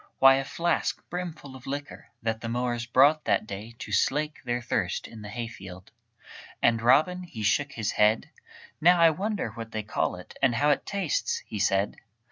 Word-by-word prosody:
Why, 135 0 +7
a 135 - -1
flask 170 +4 -1
brimful 165 -6 -6
of 130 - -12
liquor, 145 +1 -6 0.2
That 110 0 -1
the 115 - -4
mowers 120 0 -2
brought 140 +5 +4
that - - +2
day 110 +3 -8
To 105 - -8
slake 150 +9 0
their 120 -1 -1
thirst 105 -6 -2
in 115 -2 -11
the 105 - -8
hayfield. 95 -5 -8 0.7
And 115 -1 +3
Robin 155 +10 +4
he 145 -12 -7
shook 135 +7 +1
his 110 -2 -2
head: 105 +1 +2 0.5
"Now 175 +2 +6
I 165 -1 +7
wonder 200 - -2
what 115 +1 -8
they 110 -1 -2
call 105 - -1
it, 90 - -12
And 130 -3 +3
how 145 +6 +3
it 140 - -1
tastes?" 195 -6 -1
he 105 - -6
said. 100 0 +1
120 Hz, 185 wpm, -27 LUFS, 110-150 Hz, 0.7 s, Why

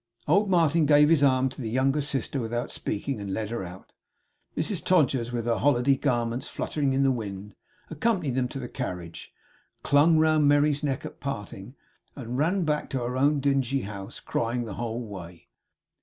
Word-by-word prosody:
Old 200 +7 +3
Martin 165 -3 +3
gave 150 0 +6
his 165 -3 +4
arm 130 -2 +4
to 130 - -9
the 115 - -3
younger 135 +5 +1
sister 140 -1 -1
without 120 +1 -3
speaking; 115 +4 -3
and 100 -1 -6
led 105 +2 -3
her 115 - -3
out. 90 +1 -11 0.7
Mrs 165 +4 +1
Todgers, 135 -9 +2
with 120 -2 -3
her 115 -1 +1
holiday 135 -1 +3
garments 120 -1 -1
fluttering 140 -3 -2
in 135 +1 +2
the 135 - +3
wind, 105 -4 -5 0.4
accompanied 165 - 0
them 125 0 0
to 130 - -7
the 125 -2 -5
carriage, 85 -6 -6 0.5
clung 155 +3 +4
round 155 -1 +4
Merry's 145 0 +3
neck 140 -3 -2
at - - -9
parting, 115 -3 -6 0.4
and 125 -3 -6
ran 180 +5 +1
back 150 -1 -1
to 135 - -2
her 125 +1 -3
own 145 +3 +2
dingy 135 -1 +1
house, 100 +1 -7
crying 120 +1 -2
the 110 - -6
whole 120 +1 -4
way. 90 -5 -10
130 Hz, 180 wpm, -26 LUFS, 115-145 Hz, 0.7 s, gave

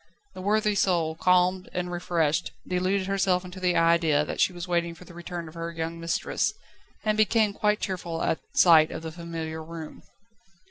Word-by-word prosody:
The 185 - -8
worthy 210 +2 +2
soul, 175 -5 +1
calmed 180 +2 +2
and 180 0 -3
refreshed, 175 -2 0
deluded 185 +2 0
herself 190 -1 +1
into 180 +1 -9
the 180 -1 +1
idea 165 -3 +3
that - - -5
she - - +4
was 175 0 -7
waiting 170 -1 0
for 180 - -14
the 175 - -13
return 175 0 -6
of 155 - -11
her 165 0 -5
young 165 0 -4
mistress, 185 +5 -1 0.5
and 215 -1 +1
became 215 0 +3
quite 210 0 +1
cheerful 175 -4 -3
at - - 0 0.2
sight 160 -3 +7
of - - -7
the 160 - -5
familiar 165 -1 -6
room. 160 -1 -9
175 Hz, 180 wpm, -26 LUFS, 165-185 Hz, 0.5 s, sight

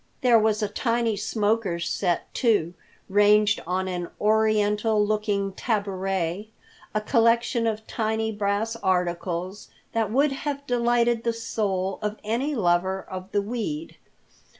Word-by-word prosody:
There 240 -3 +5
was 215 0 +1
a - - +1
tiny 230 +1 0
smoker's 205 -4 -1
set, 175 -3 -1
too, 205 -9 +2 0.3
ranged 210 +1 +4
on 185 +1 -1
an 175 -2 -3
oriental 215 0 +2
looking 205 -2 -1
tabouret, 195 -3 -2 0.5
a 215 - +2
collection 230 +1 +2
of 220 0 -2
tiny 220 0 -1
brass 205 +2 -1
articles 180 0 -2 0.2
that 225 -3 0
would 280 +4 +3
have 280 +1 -4
delighted 240 -2 +2
the 235 - 0
soul 195 -4 -2
of 210 0 -3
any 245 +8 -1
lover 185 -2 +1
of 185 +1 -7
the 205 - +1
weed. 245 +9 -4
210 Hz, 125 wpm, -25 LUFS, 195-230 Hz, 0.5 s, There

